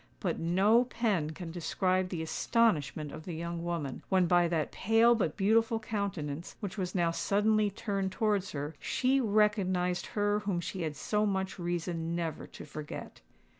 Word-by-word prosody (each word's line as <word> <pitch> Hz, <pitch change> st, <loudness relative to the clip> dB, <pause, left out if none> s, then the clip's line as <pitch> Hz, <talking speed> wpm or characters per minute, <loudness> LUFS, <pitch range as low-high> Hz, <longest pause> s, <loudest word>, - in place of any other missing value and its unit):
But -, -, -2 dB
no 200 Hz, +8 st, +4 dB
pen 215 Hz, -11 st, 0 dB
can 165 Hz, +1 st, -7 dB
describe 185 Hz, +2 st, 0 dB
the 165 Hz, -3 st, -3 dB
astonishment 160 Hz, -, +1 dB
of 155 Hz, -, -8 dB
the 175 Hz, -, -5 dB
young 170 Hz, +1 st, -4 dB
woman, 165 Hz, -6 st, -3 dB
when 185 Hz, -2 st, +4 dB
by 175 Hz, 0 st, +4 dB
that 165 Hz, -3 st, -1 dB
pale 225 Hz, +3 st, +4 dB
but 195 Hz, -10 st, -1 dB
beautiful 225 Hz, +3 st, +3 dB
countenance, 195 Hz, -8 st, -4 dB
which 200 Hz, -3 st, -5 dB
was 185 Hz, -2 st, -3 dB
now 170 Hz, -2 st, +2 dB
suddenly 210 Hz, +4 st, +2 dB
turned 195 Hz, -2 st, -2 dB
towards 205 Hz, -1 st, 0 dB
her, 145 Hz, +1 st, -4 dB
she 265 Hz, +1 st, +1 dB
recognised 200 Hz, -5 st, +1 dB
her 205 Hz, 0 st, +2 dB
whom 200 Hz, -4 st, -1 dB
she 185 Hz, +2 st, -4 dB
had 155 Hz, -2 st, -2 dB
so 210 Hz, +6 st, 0 dB
much 190 Hz, -1 st, -2 dB
reason 170 Hz, -1 st, -2 dB
never 165 Hz, -3 st, -3 dB
to -, -, -11 dB
forget. 150 Hz, +1 st, -8 dB
185 Hz, 165 wpm, -31 LUFS, 165-210 Hz, -, no